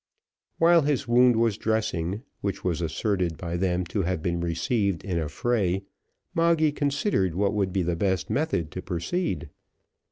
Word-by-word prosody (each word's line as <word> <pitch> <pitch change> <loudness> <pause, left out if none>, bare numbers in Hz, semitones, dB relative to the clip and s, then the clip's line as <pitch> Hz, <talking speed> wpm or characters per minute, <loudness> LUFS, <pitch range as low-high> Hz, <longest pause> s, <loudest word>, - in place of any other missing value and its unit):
While 170 0 +6
his 145 -2 0
wound 120 +1 +5
was 115 -2 +1
dressing, 110 -2 -1 0.2
which 100 -1 -3
was 85 -2 -1
asserted 85 0 -1
by 85 -1 -4
them 90 0 0
to 105 - +1
have 90 -3 -2
been 85 -1 0
received 85 +2 0
in 90 -4 -1
a 80 -2 -2
fray, 95 +1 0 0.5
Moggy 165 -2 +3
considered 140 - 0
what 100 +2 +1
would 100 -3 0
be 95 0 0
the 85 0 0
best 95 +1 0
method 135 - -1
to 90 - -5
proceed. 90 - -2
95 Hz, 160 wpm, -26 LUFS, 85-120 Hz, 0.5 s, While